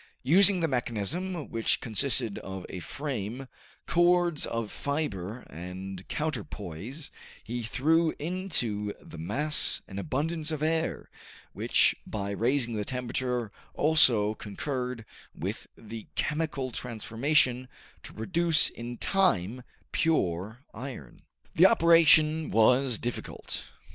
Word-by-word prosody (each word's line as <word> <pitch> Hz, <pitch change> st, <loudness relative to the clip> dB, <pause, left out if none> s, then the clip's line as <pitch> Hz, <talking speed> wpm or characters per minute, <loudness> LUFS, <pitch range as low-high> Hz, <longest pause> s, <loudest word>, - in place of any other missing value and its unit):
Using 185 Hz, +6 st, +6 dB
the 165 Hz, -, +2 dB
mechanism 140 Hz, -, -2 dB
which 115 Hz, -1 st, +1 dB
consisted 120 Hz, -1 st, -1 dB
of 95 Hz, -1 st, -7 dB
a 90 Hz, -, -6 dB
frame, 130 Hz, -, -5 dB, 0.4 s
cords 175 Hz, -2 st, +3 dB
of 115 Hz, -2 st, -3 dB
fiber 125 Hz, -, -3 dB
and 90 Hz, +3 st, -8 dB
counterpoise, 120 Hz, -, -5 dB, 0.3 s
he 120 Hz, +2 st, -4 dB
threw 160 Hz, +8 st, +2 dB
into 145 Hz, -, -1 dB
the 80 Hz, -, -11 dB
mass 140 Hz, -, +2 dB
an 100 Hz, -1 st, -6 dB
abundance 155 Hz, +6 st, -1 dB
of 155 Hz, -2 st, -3 dB
air, 160 Hz, +1 st, -1 dB, 0.4 s
which -, -, +3 dB
by 100 Hz, -2 st, -3 dB
raising 120 Hz, +3 st, +1 dB
the 105 Hz, -1 st, -1 dB
temperature 125 Hz, -2 st, -2 dB, 0.2 s
also 120 Hz, -9 st, +4 dB
concurred 125 Hz, +2 st, -4 dB, 0.3 s
with -, -, -5 dB
the 110 Hz, 0 st, -9 dB
chemical 150 Hz, -4 st, -1 dB
transformation 125 Hz, +3 st, 0 dB, 0.3 s
to -, -, -10 dB
produce 165 Hz, +7 st, +2 dB
in 120 Hz, +1 st, -7 dB
time 125 Hz, -, +1 dB, 0.3 s
pure 110 Hz, -, 0 dB
iron. 110 Hz, -, -8 dB, 0.3 s
The 180 Hz, +4 st, +7 dB
operation 160 Hz, -5 st, +5 dB
was 125 Hz, +2 st, +4 dB
difficult. 120 Hz, +2 st, -4 dB
125 Hz, 110 wpm, -28 LUFS, 110-155 Hz, 0.4 s, The